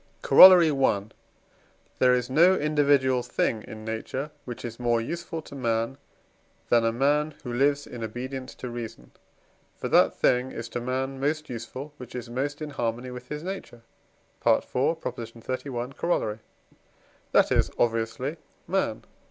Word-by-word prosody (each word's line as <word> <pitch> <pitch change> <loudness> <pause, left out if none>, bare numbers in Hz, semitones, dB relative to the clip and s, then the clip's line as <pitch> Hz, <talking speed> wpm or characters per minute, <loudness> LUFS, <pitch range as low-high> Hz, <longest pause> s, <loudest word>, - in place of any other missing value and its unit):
Corollary 180 -4 +9
I. 135 -8 +2 1.0
There 125 0 +5
is 125 -1 -1
no 170 +8 +5
individual 145 -5 +2
thing 110 -2 -1
in 110 0 -9
nature, 130 +6 -4
which 120 -1 -7
is 115 0 -7
more 120 -1 +2
useful 165 +6 -5
to - - -13
man, 115 0 -1 0.7
than 120 -1 +4
a 115 - +2
man 145 +5 +1
who 125 -3 -5
lives 140 +3 +2
in 120 -2 -8
obedience 130 +4 -6
to 125 - -7
reason. 120 -2 -8 0.7
For - - -4
that - - +4
thing 125 +1 +2
is 115 0 -6
to 120 - -4
man 130 +2 -2
most 155 +1 -1
useful, 125 +5 -7
which 125 -2 -10
is 120 -1 -6
most 145 +4 -3
in 150 - -6
harmony 120 -1 -3
with 125 0 -9
his 150 +1 -5
nature 180 -11 -7 0.6
(IV. - - +3
xxxi. 125 -2 -3
Coroll.); 110 -12 -1 0.9
that - - +4
is, - - +3
obviously, 115 +6 -1 0.3
man. 175 - -1
130 Hz, 145 wpm, -26 LUFS, 120-145 Hz, 1.0 s, Corollary